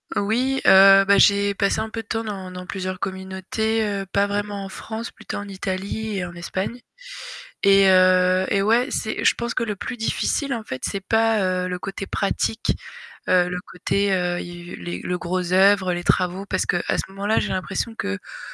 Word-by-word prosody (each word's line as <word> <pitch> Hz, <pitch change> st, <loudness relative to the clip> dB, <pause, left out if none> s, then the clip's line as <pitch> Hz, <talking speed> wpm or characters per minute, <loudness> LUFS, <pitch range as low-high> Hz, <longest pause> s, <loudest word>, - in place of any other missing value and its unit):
Oui, 250 Hz, +6 st, 0 dB
heu, 195 Hz, 0 st, +8 dB
bah 200 Hz, -, +5 dB
j'ai 200 Hz, 0 st, +4 dB
passé 200 Hz, +2 st, +1 dB
un 220 Hz, 0 st, -3 dB
peu 225 Hz, 0 st, -5 dB
de -, -, -35 dB
temps 225 Hz, 0 st, -2 dB
dans 195 Hz, -4 st, -6 dB
dans 180 Hz, 0 st, -8 dB
plusieurs 185 Hz, -1 st, -4 dB
communautés, 190 Hz, +4 st, -2 dB
heu, 200 Hz, -2 st, -2 dB
pas 200 Hz, +2 st, +1 dB
vraiment 205 Hz, 0 st, -3 dB
en 195 Hz, -, -8 dB
France, 225 Hz, +4 st, -6 dB
plutôt 220 Hz, -, -7 dB
en 205 Hz, -, -6 dB
Italie 195 Hz, +2 st, -4 dB
et 180 Hz, -, -2 dB
en 175 Hz, -1 st, -9 dB
Espagne. 190 Hz, +7 st, -4 dB, 0.8 s
Et, 195 Hz, 0 st, +6 dB
heu, 185 Hz, 0 st, +4 dB
et 200 Hz, -, +2 dB
ouais, 230 Hz, +5 st, +3 dB
c'est 220 Hz, -, -2 dB
je -, -, +6 dB
pense 235 Hz, 0 st, -4 dB
que 255 Hz, -, 0 dB
le 210 Hz, -3 st, -3 dB
plus 245 Hz, -, -6 dB
difficile 270 Hz, +4 st, -1 dB
en 230 Hz, -, -4 dB
fait, 130 Hz, -10 st, -7 dB
c'est 195 Hz, -, -3 dB
pas, 225 Hz, +1 st, +2 dB, 0.2 s
heu, 180 Hz, -, -2 dB
le 180 Hz, 0 st, -4 dB
côté 195 Hz, +3 st, -5 dB
pratique, 210 Hz, +3 st, -1 dB, 0.5 s
heu, 180 Hz, -1 st, +4 dB
le 180 Hz, 0 st, -3 dB
côté, 200 Hz, +2 st, -1 dB
heu, 180 Hz, -1 st, -1 dB
i 175 Hz, 0 st, -9 dB
u -, -, -7 dB
les 90 Hz, 0 st, -6 dB
le 180 Hz, 0 st, -2 dB
gros 180 Hz, 0 st, -2 dB
oeuvre, 190 Hz, -1 st, +4 dB
les 175 Hz, 0 st, -4 dB
travaux, 185 Hz, +2 st, 0 dB
parce 185 Hz, -2 st, -1 dB
qu'à 175 Hz, -, 0 dB, 0.2 s
ce -, -, -1 dB
moment-là, 200 Hz, +3 st, 0 dB
j'ai -, -, -2 dB
l'impression 195 Hz, +4 st, -3 dB
qu'on 95 Hz, 0 st, -5 dB
195 Hz, 200 wpm, -22 LUFS, 185-215 Hz, 0.8 s, heu